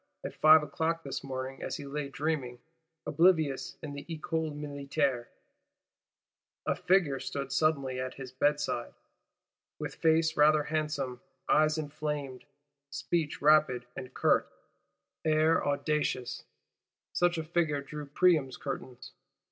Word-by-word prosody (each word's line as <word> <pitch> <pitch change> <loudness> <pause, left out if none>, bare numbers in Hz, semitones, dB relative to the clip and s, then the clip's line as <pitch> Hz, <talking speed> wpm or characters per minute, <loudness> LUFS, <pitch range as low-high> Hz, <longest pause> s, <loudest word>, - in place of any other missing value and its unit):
At - - -5
five 155 0 +7
o'clock 160 +3 -2
this 135 -1 -5
morning, 130 0 -5
as - - -3
he 145 - -8
lay 140 0 -4
dreaming, 140 -4 -2 0.5
oblivious 155 -3 +2
in 145 -2 -5
the 140 - -7
Ecole 160 0 -2
Militaire, 140 -3 -2 1.4
a - - +2
"figure" 180 -6 +2
stood 140 0 -4
suddenly 140 -3 +1
at 130 0 -4
his 135 -2 -8
bedside: 145 -2 0 0.8
"with - - -5
face 160 0 +2
rather 150 0 +5
handsome; 150 -5 -2 0.3
eyes 155 +1 +3
inflamed, 145 -3 -4 0.4
speech 155 0 -2
rapid 145 -5 +4
and 130 -1 -7
curt, - - +2 0.7
air 155 +1 +3
audacious:" 145 -3 -1 0.7
such 175 -1 +2
a 160 - -2
figure 155 -3 0
drew 150 +1 -8
Priam's 145 -3 +2
curtains! 130 -2 -6
150 Hz, 120 wpm, -30 LUFS, 135-155 Hz, 1.4 s, five